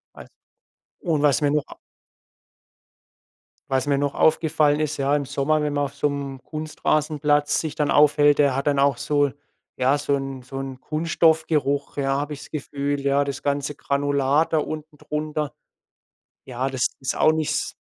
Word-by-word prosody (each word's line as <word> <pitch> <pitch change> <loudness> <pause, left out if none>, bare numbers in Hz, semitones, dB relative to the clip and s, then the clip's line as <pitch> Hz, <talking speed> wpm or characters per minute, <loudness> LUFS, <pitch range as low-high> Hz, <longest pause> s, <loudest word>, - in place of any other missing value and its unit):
Was - - -11 0.7
und 160 -5 0
was 145 -4 +3
mir 145 - +3
noch 150 -1 0
a - - -12 1.9
Was 135 0 0
mir 140 -1 +2
noch 145 0 -1
aufgefallen 155 -2 +2
ist, 155 0 -1
ja, 140 +1 +1
im 145 -1 -1
Sommer, 140 +3 0
wenn 150 -1 -1
man 145 0 +1
auf 140 0 -8
so 145 - +1
'nem 140 -2 -5
Kunstrasenplatz 150 -1 0
sich 155 -2 -3
dann 150 -1 -1
aufhält, 145 0 +5
der 140 -3 +3
hat 140 +2 -2
dann 145 -1 +2
auch 140 -2 +3
so 145 0 +1 0.5
ja 130 +3 +3
so 145 0 -1
'n 135 -2 -5
so 135 +1 -7
'n 135 -1 -6
Kunststoffgeruch, 155 -2 +1
ja, 135 -1 0
habe 145 +1 -4
ich 145 - -9
das - - -13
Gefühl, 145 -1 -3
ja, 140 +1 +2
das 140 -1 -5
ganze 140 0 -1
Granulat 140 +2 0
da 160 - +4
unten 155 0 -6
drunter. 150 -1 -3 0.9
Ja, 130 +1 -3
das 130 -2 0
ist 135 - -3
auch 155 - +4
nicht 155 -1 -1
s - - -2
145 Hz, 175 wpm, -23 LUFS, 140-150 Hz, 1.9 s, aufhält